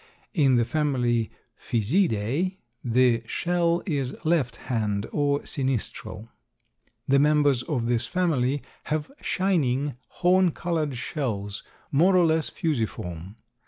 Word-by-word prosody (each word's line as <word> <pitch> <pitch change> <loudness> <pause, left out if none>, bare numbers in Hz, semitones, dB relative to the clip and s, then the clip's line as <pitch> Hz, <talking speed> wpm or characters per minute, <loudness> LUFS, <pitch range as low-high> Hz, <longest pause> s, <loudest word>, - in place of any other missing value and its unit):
In 140 - +4
the 120 -1 +3
family 125 -6 0 0.3
Physidae 135 - 0 0.3
the 120 -1 +3
shell 170 +2 +1
is 140 -7 -2
left 150 -8 +1
hand 105 -5 -2
or 145 -1 +1
sinistral. 115 -5 -4 0.8
The 140 +1 +4
members 145 -3 +3
of 130 -5 -2
this 120 -1 0
family 145 -7 0 0.2
have 155 - -2
shining, 145 -8 0
horn 180 -1 +3
colored 160 -5 -2
shells, 110 -7 -3 0.3
more 180 +7 +4
or 175 - +5
less 160 -1 +1
fusiform. 100 - -3
140 Hz, 110 wpm, -26 LUFS, 120-165 Hz, 0.8 s, or